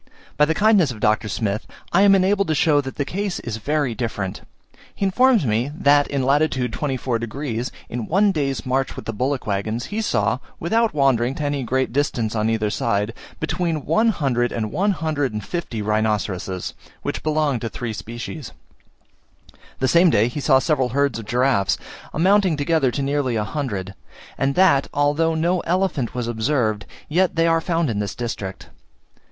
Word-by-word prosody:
By 150 - +4
the 160 +2 0
kindness 205 -6 +4
of 115 -4 -6
Dr. 110 +1 +1
Smith, 100 +2 -2 0.3
I 185 - +5
am 200 -1 +7
enabled 195 +1 +2
to 155 - +1
show 145 0 +3
that 135 -1 -7
the 145 - -1
case 195 +4 -3
is 115 -2 -4
very 145 +2 0
different. 105 -4 -4 0.5
He 195 - -1
informs 235 - +4
me, 115 +4 +1
that 145 -1 +4
in 140 -2 -1
lat. 140 +3 +3
24 130 -1 -2
degs., 120 +1 -4 0.2
in 120 -2 -5
one 200 +4 +3
day's 135 - -2
march 130 +1 0
with - - -8
the 115 - -3
bullock 130 +5 -1
waggons, 110 +3 -2
he 220 - 0
saw, 110 - +1 0.2
without 225 +3 +1
wandering 135 -3 +2
to 150 - -4
any 145 -1 -1
great 130 0 -1
distance 125 -6 0
on 110 0 +1
either 110 -2 0
side, 105 0 0 0.3
between 160 -2 -2
one 225 +1 +3
hundred 130 - 0
and 110 -2 -3
one 195 +7 +1
hundred 155 - -1
and 105 -1 -4
fifty 140 -11 -4
rhinoceroses, 105 -4 -1 0.3
which - - -3
belonged 150 -5 0
to 115 - -3
three 115 -2 -5
species: 120 +6 -7 1.2
the 130 - +1
same 170 +5 +5
day 110 -5 +3
he 135 - -5
saw 135 -1 +4
several 130 -1 +1
herds 140 -1 0
of 115 - -8
giraffes, 125 -5 +2 0.3
amounting 185 0 +3
together 145 -2 +2
to 140 +3 -2
nearly 140 -3 0
a 110 - 0
hundred; 100 -6 -4 0.4
and 135 0 0
that 175 -7 +4
although 150 +3 +2
no 170 +3 +1
elephant 170 - -1
was 120 -2 -2
observed, 110 -2 0 0.2
yet 180 +3 +1
they 165 0 +3
are 165 0 +3
found 170 -2 0
in 110 -5 -1
this 100 -2 -3
district. 105 -6 -5
135 Hz, 180 wpm, -22 LUFS, 115-160 Hz, 1.2 s, am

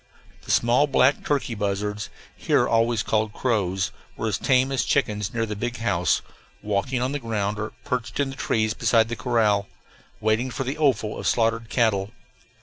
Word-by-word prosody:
The - - -13
small 120 +5 +3
black 135 0 +3
turkey 140 -5 -1
buzzards, 105 0 -2 0.3
here - - +2
always 115 -1 +2
called 110 -1 0
crows, 95 -6 0 0.3
were 110 - -2
as 110 - -1
tame 130 0 +2
as 130 -3 +1
chickens 105 -7 0
near 115 -1 -1
the 105 -1 -4
big 120 +3 -3
house, 95 -8 +1 0.4
walking 120 +5 -1
on 130 - -1
the 145 - -2
ground 105 -3 -2
or 105 +1 -3
perched 125 +1 -3
in 140 -1 0
the - - -8
trees 110 -4 0
beside 115 -1 +2
the 120 - -2
corral, 110 -6 +1 0.5
waiting 110 +4 +1
for 125 +2 -3
the 135 +2 -3
offal 130 -8 +1
of - - -6
the - - +4
slaughtered 115 -1 +1
cattle. 105 -5 +1
115 Hz, 180 wpm, -24 LUFS, 105-125 Hz, 0.5 s, the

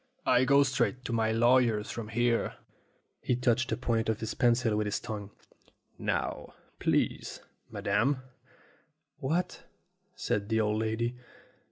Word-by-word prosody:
I 125 - +4
go 140 +2 +6
straight 130 -2 0
to 120 - -2
my 110 -1 +2
lawyer's 115 -2 +3
from 115 -2 -5
here." 120 +1 +1 0.7
He 125 - +1
touched 125 +1 +1
the - - -1
point 115 -2 0
of 110 - 0
his 110 0 -3
pencil 120 -3 +2
with 105 0 0
his 105 - -1
tongue. 105 -2 -6 0.7
"Now, - - -2 0.2
please, - - 0 0.3
madam 130 +7 0 0.5
?" - - -39
"What?" 165 +7 -1 0.5
said 100 +1 -2
the 110 0 +2
old 105 0 +1
lady. 115 +2 -1
115 Hz, 140 wpm, -30 LUFS, 110-125 Hz, 0.7 s, go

